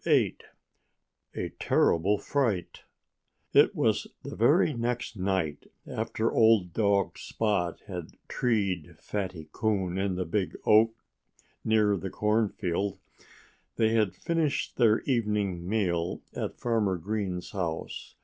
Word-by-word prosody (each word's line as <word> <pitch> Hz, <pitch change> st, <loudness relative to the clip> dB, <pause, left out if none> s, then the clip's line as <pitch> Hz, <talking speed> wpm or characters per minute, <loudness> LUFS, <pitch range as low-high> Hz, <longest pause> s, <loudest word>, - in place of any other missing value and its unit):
VIII -, -, +3 dB, 1.0 s
A -, -, -3 dB
TERRIBLE 95 Hz, +6 st, +3 dB
FRIGHT 115 Hz, -11 st, -1 dB, 0.7 s
It -, -, +5 dB
was -, -, +1 dB, 0.2 s
the -, -, -6 dB
very -, -, +4 dB
next 120 Hz, 0 st, -2 dB
night 95 Hz, -6 st, -1 dB, 0.2 s
after 115 Hz, +1 st, -2 dB
old 110 Hz, -6 st, +4 dB
dog 100 Hz, -1 st, +1 dB
Spot 100 Hz, -6 st, -1 dB
had 90 Hz, -4 st, -7 dB
treed 100 Hz, -9 st, -1 dB
Fatty 95 Hz, -6 st, -4 dB
Coon 95 Hz, -4 st, 0 dB
in 95 Hz, -1 st, 0 dB
the 90 Hz, 0 st, -2 dB
big 90 Hz, +3 st, -2 dB
oak 110 Hz, +1 st, +5 dB, 0.7 s
near 105 Hz, -2 st, +3 dB
the 95 Hz, +2 st, -5 dB
cornfield. 100 Hz, -3 st, 0 dB, 0.8 s
They 110 Hz, -1 st, +3 dB
had 110 Hz, -5 st, +1 dB
finished 165 Hz, -, -1 dB
their 115 Hz, -3 st, +4 dB
evening 105 Hz, -8 st, -1 dB
meal 90 Hz, -6 st, 0 dB
at -, -, -4 dB
Farmer 110 Hz, -6 st, +1 dB
Green's 95 Hz, -1 st, -3 dB
house. 85 Hz, -4 st, -4 dB
100 Hz, 115 wpm, -28 LUFS, 90-110 Hz, 1.0 s, It